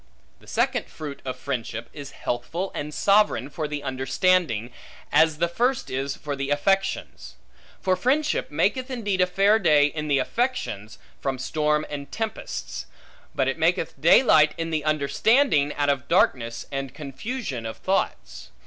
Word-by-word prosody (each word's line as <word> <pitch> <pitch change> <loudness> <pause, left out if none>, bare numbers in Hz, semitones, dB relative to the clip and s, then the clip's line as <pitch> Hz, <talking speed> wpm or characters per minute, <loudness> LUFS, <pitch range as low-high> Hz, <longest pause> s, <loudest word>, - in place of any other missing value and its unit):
The - - -20
second - - 0
fruit 145 -3 -8
of 130 - -4
friendship, 115 -4 -4
is 140 -2 -8
healthful 160 +9 -4
and 150 +1 -4
sovereign 200 -6 +2
for 155 0 -3
the 145 -1 -5
understanding, 130 - +1 0.4
as 160 -1 +4
the 170 - +2
first 245 +9 0
is 135 +1 -2
for 145 -1 -5
the 140 0 -3
affections. 195 +7 -1 0.5
For 185 -1 +2
friendship 285 +10 0
maketh 230 - 0
indeed 205 -7 -1
a 180 - +4
fair 195 +4 +3
day 150 -7 +5
in 150 +1 -3
the 145 -2 +3
affections, 135 - -2 0.2
from 135 -1 -2
storm 150 +3 0
and 140 -1 -7
tempests; 220 -2 -5 0.5
but 130 - +1
it 135 +5 -1
maketh 165 0 +1
daylight 155 - +6
in 165 0 -3
the 155 -2 -1
understanding, 155 - +3
out 145 0 +1
of 140 -3 0
darkness, 115 -2 +1
and 135 -2 -4
confusion 145 - -5
of 110 - -7
thoughts. 65 - -2
150 Hz, 150 wpm, -25 LUFS, 135-190 Hz, 0.5 s, daylight